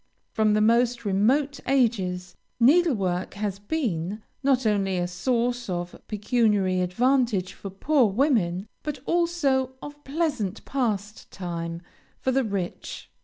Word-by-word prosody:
From 215 Hz, -2 st, +2 dB
the 215 Hz, -, +3 dB
most 235 Hz, +1 st, +3 dB
remote 260 Hz, +9 st, +2 dB
ages 190 Hz, -9 st, +1 dB, 0.2 s
needlework 235 Hz, -, +3 dB
has 200 Hz, -1 st, -3 dB
been, 205 Hz, -, -2 dB, 0.2 s
not 265 Hz, -3 st, +2 dB
only 195 Hz, -3 st, +1 dB
a 175 Hz, 0 st, 0 dB
source 240 Hz, +6 st, -1 dB
of 175 Hz, -1 st, -3 dB
pecuniary 210 Hz, -4 st, +1 dB
advantage 230 Hz, 0 st, +1 dB
for 200 Hz, -, -8 dB
poor 255 Hz, +6 st, +2 dB
women, 200 Hz, -, +1 dB
but 300 Hz, -1 st, -4 dB
also 305 Hz, -7 st, +1 dB
of 290 Hz, +1 st, -10 dB
pleasant 275 Hz, -, -2 dB
pastime 190 Hz, -8 st, -3 dB, 0.4 s
for 260 Hz, -, 0 dB
the 265 Hz, +1 st, +2 dB
rich. 195 Hz, -5 st, -5 dB
220 Hz, 120 wpm, -26 LUFS, 190-265 Hz, 0.4 s, the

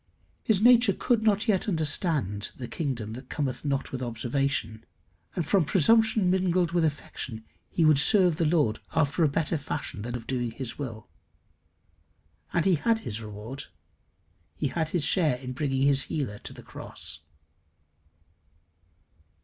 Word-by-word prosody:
His 215 Hz, -2 st, +2 dB
nature 240 Hz, -3 st, +6 dB
could 240 Hz, -3 st, +1 dB
not 215 Hz, 0 st, +2 dB
yet 210 Hz, -1 st, +2 dB
understand 150 Hz, -, 0 dB
the 125 Hz, -, -6 dB
kingdom 120 Hz, -9 st, -3 dB
that 130 Hz, +2 st, -10 dB
cometh 140 Hz, -4 st, -3 dB
not 140 Hz, -2 st, -1 dB
with 130 Hz, -, -4 dB
observation, 120 Hz, -1 st, -2 dB, 0.5 s
and 170 Hz, -, -1 dB
from 190 Hz, +3 st, +3 dB
presumption 210 Hz, +4 st, +3 dB
mingled 180 Hz, -2 st, +1 dB
with 170 Hz, -1 st, +2 dB
affection, 130 Hz, -6 st, -3 dB, 0.2 s
he 165 Hz, -, +1 dB
would 155 Hz, -3 st, +5 dB
serve 180 Hz, +1 st, +4 dB
the 165 Hz, -, +1 dB
Lord 150 Hz, -10 st, +2 dB, 0.2 s
after 160 Hz, +2 st, +2 dB
a -, -, +5 dB
better 160 Hz, +2 st, -1 dB
fashion 145 Hz, -6 st, -4 dB
than 120 Hz, +3 st, -5 dB
that -, -, -1 dB
of 115 Hz, -, -11 dB
doing 120 Hz, -2 st, -2 dB
his 120 Hz, +2 st, -6 dB
will. 115 Hz, -6 st, -6 dB, 1.4 s
And 170 Hz, -, +1 dB
he 190 Hz, -, +4 dB
had 225 Hz, +8 st, +1 dB
his 110 Hz, -, -5 dB
reward. 110 Hz, +6 st, -7 dB, 0.9 s
He 140 Hz, -, -1 dB
had 160 Hz, +1 st, -1 dB
his 170 Hz, -2 st, 0 dB
share 155 Hz, -5 st, +3 dB
in 130 Hz, 0 st, -6 dB
bringing 135 Hz, -1 st, -1 dB
his 140 Hz, 0 st, +4 dB
healer 105 Hz, -9 st, -3 dB
to -, -, -6 dB
the -, -, -12 dB
cross. -, -, -8 dB
145 Hz, 155 wpm, -27 LUFS, 125-175 Hz, 1.4 s, nature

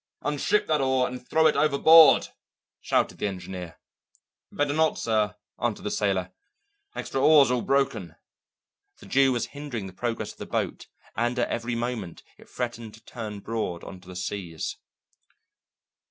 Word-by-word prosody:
"Unship 150 Hz, +8 st, +1 dB
that 155 Hz, -2 st, +1 dB
oar 130 Hz, -1 st, +2 dB
and 125 Hz, 0 st, -8 dB
throw 160 Hz, 0 st, +3 dB
it 155 Hz, -, +4 dB
overboard," 155 Hz, +2 st, +6 dB, 0.5 s
shouted -, -, 0 dB
the -, -, 0 dB
engineer. 90 Hz, -3 st, -7 dB, 0.7 s
"Better 145 Hz, 0 st, 0 dB
not, 160 Hz, +1 st, +2 dB
sir," 110 Hz, -2 st, 0 dB, 0.3 s
answered 120 Hz, -4 st, -1 dB
the 105 Hz, -, -3 dB
sailor. 95 Hz, -3 st, 0 dB, 0.6 s
"Extra 135 Hz, -, -3 dB
oars 145 Hz, -3 st, +6 dB
all 125 Hz, -1 st, +1 dB
broken." 130 Hz, -, 0 dB, 0.8 s
The -, -, -15 dB
Jew 135 Hz, 0 st, +3 dB
was 120 Hz, -2 st, -1 dB
hindering 140 Hz, -8 st, -5 dB
the 95 Hz, -, -9 dB
progress 110 Hz, 0 st, -3 dB
of -, -, -19 dB
the -, -, -7 dB
boat -, -, -3 dB, 0.3 s
and 120 Hz, +1 st, 0 dB
at 120 Hz, -, 0 dB
every 120 Hz, +1 st, -2 dB
moment 115 Hz, -7 st, -4 dB, 0.2 s
it -, -, -17 dB
threatened 115 Hz, -3 st, -5 dB
to 115 Hz, -, -20 dB
turn 105 Hz, -4 st, -7 dB
broad 110 Hz, -6 st, -3 dB
on 95 Hz, -2 st, -10 dB
to 90 Hz, -, -19 dB
the 90 Hz, -, -10 dB
seas. 90 Hz, -3 st, -4 dB
120 Hz, 155 wpm, -26 LUFS, 100-135 Hz, 0.8 s, overboard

